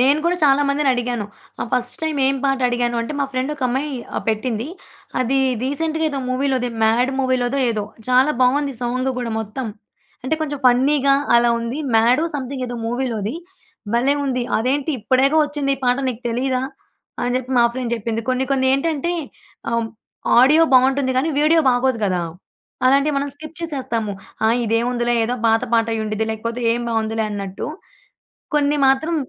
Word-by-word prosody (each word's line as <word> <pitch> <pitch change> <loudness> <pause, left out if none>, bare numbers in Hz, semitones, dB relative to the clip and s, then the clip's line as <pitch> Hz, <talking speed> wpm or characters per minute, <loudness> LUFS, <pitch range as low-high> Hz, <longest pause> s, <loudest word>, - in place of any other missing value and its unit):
నేను 275 +4 +4
కూడా 355 +1 +2
చాలా 280 0 +4
మందినడిగాను. 245 -6 0 0.3
ఆహ్, - - -3
ఫస్ట్ 250 0 -1
టైమ్ 315 -2 -1
ఏం 275 0 +2
పాట 270 -1 +2
అడిగాను 240 0 0
అంటే 230 - -5
మా 280 - +2
ఫ్రెండ్ 260 +3 -1
ఒక 275 - -9
అమ్మాయి 275 +4 -2 0.2
ఆహ్, - - -3
పెట్టింది. 225 +2 -1 0.5
అదిది 265 +2 +1 0.2
రీసెంట్‌గా 320 +4 -1
ఏదో 275 -2 -3
మూవీలో 265 +1 +1 0.3
'మాడ్' 245 +4 +2
మూవీ‌లోదో 260 0 0
ఏదో. 215 -2 -2 0.2
చాలా 255 +4 +4
బాగుంది 275 +2 +2
సాంగ్ 255 +2 -1
గూడా 240 -2 -3
మొత్తం. 220 +4 -5 0.6
అంటే 290 - +1
కొంచెం 290 -2 -3
ఫన్నీగా, 275 +3 +4 0.2
అలా 235 0 +4
ఉంది. 235 +4 -4 0.2
మ్యాడో 245 +8 +4
సమ్‌థింగ్ 260 -1 -4
ఏదో 240 - -5
మూవీలోది. 235 -3 -2 0.6
భలే 260 +4 +3
ఉంది! 255 -2 -1
"అదేంటి? 265 +6 0
ఇప్పుడేగా 260 +7 +2
ఒచ్చింది 290 -1 -2
ఈ - - -16
పాట. 250 +1 +2
నీకు 240 -2 -4
తెలీదా?" 255 +2 -1 0.6
అని 245 0 0
జెప్పి 255 0 -4
మా 240 - +6
ఫ్రెండ్ 245 -1 -3
జెప్పింది. 225 0 -3
కొన్ని 255 +1 +1
కొన్ని 260 -1 +2
ఏంటంటే, 315 +4 0 0.6
ఆహ్, 230 -1 0 0.5
ఆడియో 300 +6 +6
బాగుంటుంది 260 +1 +4
కానీ 280 +5 +1
వీడియో 320 +2 +4
బాగోదు 250 0 +1
కదా! 185 -2 0 0.7
అలాంటివి 280 +3 +3
మనం 285 +1 -2
స్కిప్ 310 +2 -11
చేసేస్తాము. 250 -10 -3 0.3
ఆ! - - +4 0.2
ఇదేముందిలే, 240 +2 0
ఏదో 245 - -1
పాత 225 +1 +3
పాటయ్యుండిద్ది. 220 -1 0
లేకపోతే 230 +2 -4
ఏం 240 - -1
బాగుందిలే 225 -1 -1
అన్నట్టు. 200 -2 -5 0.9
కొన్ని 295 0 +2
మాత్రం 310 +5 +2
255 Hz, 160 wpm, -20 LUFS, 235-280 Hz, 0.9 s, మా